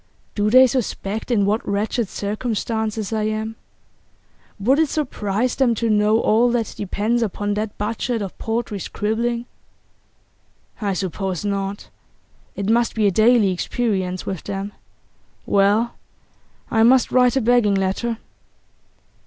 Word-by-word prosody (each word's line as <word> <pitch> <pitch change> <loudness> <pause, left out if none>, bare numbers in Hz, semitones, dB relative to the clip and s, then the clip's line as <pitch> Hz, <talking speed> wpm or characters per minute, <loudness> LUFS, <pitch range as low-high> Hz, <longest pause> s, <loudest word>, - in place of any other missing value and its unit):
'Do 210 0 +1
they 255 +3 +8
suspect 225 -4 -2
in 215 -5 +2
what 210 +3 0
wretched 210 +2 -1
circumstances 220 0 -2
I 215 -1 0
am? 215 +1 -2 1.0
Would 260 +9 +3
it 320 -2 +3
surprise 240 -6 -1
them 245 -4 +2
to 230 0 0
know 210 +1 +3
all 230 +2 +3
that 230 -3 -1
depends 210 +4 -1
upon 205 -1 -1
that 210 0 -3
budget 230 +3 -2
of 195 -3 -5
paltry 225 -2 -2
scribbling? 235 +5 -2 1.4
I 200 -2 0
suppose 190 0 -3
not; 200 0 -3 0.7
it 200 - -3
must 235 +2 +2
be 220 -2 +2
a 200 - +4
daily 220 0 +4
experience 185 -1 -2
with 190 -4 -5
them. 200 0 -4 0.7
Well, 205 +4 +2 0.8
I 225 - +3
must 245 +3 +5
write 250 0 +4
a 265 - +2
begging 230 -3 +3
letter. 195 +5 -1
215 Hz, 130 wpm, -21 LUFS, 200-235 Hz, 1.4 s, they